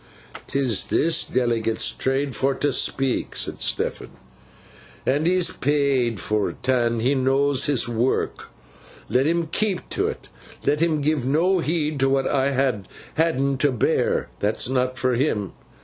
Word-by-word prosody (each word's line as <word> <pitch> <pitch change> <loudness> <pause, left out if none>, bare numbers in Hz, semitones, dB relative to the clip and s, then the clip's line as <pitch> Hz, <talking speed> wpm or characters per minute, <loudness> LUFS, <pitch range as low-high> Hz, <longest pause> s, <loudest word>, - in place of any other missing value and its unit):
''Tis 130 -6 +1
this 165 +1 +2
Delegate's 115 -3 0
trade 135 0 -2
for 135 0 +1
t' 145 +2 0
speak,' 135 -2 0
said - - -2
Stephen, - - -2 1.0
'an' 145 +5 +1
he's 180 0 +2
paid 135 -6 0
for 105 -1 -1
't, 130 +1 -1
an' 120 -2 +1
he 130 +4 +2
knows 135 +1 +2
his 140 -5 +1
work. 120 +2 -1 0.6
Let 130 +3 +2
him 170 +1 +1
keep 210 -3 -1
to - - 0
't. - - -20 0.4
Let 150 +2 +1
him 160 -3 +1
give 145 -3 0
no 175 +7 +2
heed 155 -3 -1
to 135 0 +3
what 135 0 +1
I 140 -1 +1
ha 130 -5 +1 0.4
had'n 140 -4 +1
to 145 0 +3
bear. 125 - 0
That's 105 +3 +1
not 130 -1 0
for 130 +1 +1
him. 115 -6 -1
135 Hz, 150 wpm, -23 LUFS, 125-150 Hz, 1.0 s, to